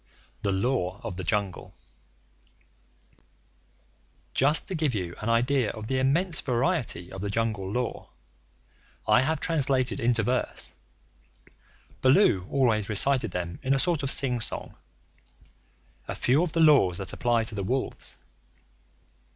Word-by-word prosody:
THE 100 Hz, -, -1 dB
LAW 95 Hz, -1 st, -1 dB
OF -, -, -5 dB
THE 95 Hz, -, -6 dB
JUNGLE 95 Hz, +1 st, -3 dB, 2.6 s
Just 145 Hz, +4 st, +1 dB
to -, -, -5 dB
give 155 Hz, -7 st, -1 dB
you 90 Hz, -4 st, -4 dB
an 110 Hz, -, -3 dB
idea 120 Hz, 0 st, +1 dB
of 110 Hz, -, -7 dB
the 130 Hz, +3 st, -1 dB
immense 160 Hz, +6 st, +2 dB
variety 125 Hz, -, -1 dB
of 95 Hz, -, -8 dB
the 100 Hz, -, -3 dB
Jungle 105 Hz, -3 st, -2 dB
Law, 125 Hz, +1 st, -4 dB, 1.0 s
I -, -, +4 dB
have 155 Hz, +3 st, -1 dB
translated 135 Hz, -8 st, 0 dB
into 115 Hz, -1 st, +1 dB
verse 125 Hz, +3 st, -2 dB, 1.3 s
(Baloo 130 Hz, -, +3 dB
always 115 Hz, -7 st, +1 dB
recited 120 Hz, +3 st, +6 dB
them 85 Hz, -1 st, -5 dB
in 135 Hz, +1 st, +1 dB
a -, -, +1 dB
sort 165 Hz, +1 st, 0 dB
of 135 Hz, -, -2 dB
sing 125 Hz, -3 st, +5 dB
song) 110 Hz, -, -4 dB, 1.3 s
a -, -, -5 dB
few 135 Hz, +5 st, +2 dB
of 175 Hz, -3 st, -2 dB
the 165 Hz, -, +1 dB
laws 140 Hz, -, +4 dB
that 95 Hz, -, -5 dB
apply 120 Hz, -1 st, 0 dB
to 110 Hz, -, -1 dB
the 100 Hz, -2 st, -4 dB
wolves. 130 Hz, +7 st, -3 dB
120 Hz, 135 wpm, -26 LUFS, 100-140 Hz, 2.6 s, recited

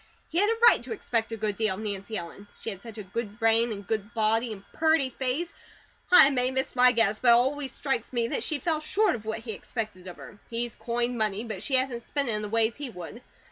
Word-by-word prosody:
He 335 Hz, -, 0 dB
had 415 Hz, +2 st, +4 dB
a 455 Hz, -, +1 dB
right -, -, +6 dB
to -, -, -9 dB
expect 230 Hz, -, -2 dB
a 225 Hz, -, -3 dB
good 210 Hz, -1 st, -2 dB
deal 215 Hz, -4 st, 0 dB
of 200 Hz, -, -7 dB
Nancy 205 Hz, +1 st, -4 dB
Ellen. 175 Hz, +4 st, -8 dB
She 225 Hz, -, -4 dB
had 195 Hz, -2 st, -9 dB
such 230 Hz, -1 st, -10 dB
a 210 Hz, -, -5 dB
good 210 Hz, +2 st, -5 dB
brain, 225 Hz, 0 st, +3 dB
and 200 Hz, -2 st, -6 dB
good 215 Hz, +2 st, -3 dB
body, 225 Hz, +2 st, +2 dB
and 200 Hz, -2 st, -8 dB
purty 315 Hz, -5 st, +2 dB
face. 270 Hz, +7 st, -2 dB, 0.6 s
I 325 Hz, -6 st, +9 dB
may 250 Hz, -1 st, +1 dB
miss 265 Hz, 0 st, -2 dB
my 250 Hz, 0 st, +6 dB
guess, 220 Hz, -3 st, +2 dB
but 255 Hz, -, -1 dB
it -, -, +9 dB
always 265 Hz, +3 st, +2 dB
strikes 270 Hz, -5 st, -2 dB
me 235 Hz, -2 st, 0 dB
that -, -, -1 dB
she 310 Hz, -, -1 dB
falls 310 Hz, +2 st, -1 dB
SHORT 415 Hz, +5 st, +2 dB
of 220 Hz, -3 st, -6 dB
what 220 Hz, +1 st, -3 dB
he 230 Hz, -1 st, -6 dB
expected 210 Hz, -3 st, -6 dB
of 180 Hz, -, -9 dB
her. 205 Hz, -, -12 dB
He's 235 Hz, 0 st, -3 dB
coined 240 Hz, 0 st, -2 dB
money, 215 Hz, 0 st, 0 dB
but 215 Hz, -5 st, -6 dB
she 265 Hz, +4 st, 0 dB
hasn't 255 Hz, -2 st, 0 dB
spent 280 Hz, +1 st, -1 dB
it -, -, +1 dB
in 210 Hz, -1 st, -1 dB
the 210 Hz, -, -5 dB
ways 225 Hz, +1 st, +1 dB
he 285 Hz, -2 st, -5 dB
would. 180 Hz, +3 st, -9 dB
230 Hz, 255 wpm, -27 LUFS, 215-260 Hz, 0.6 s, I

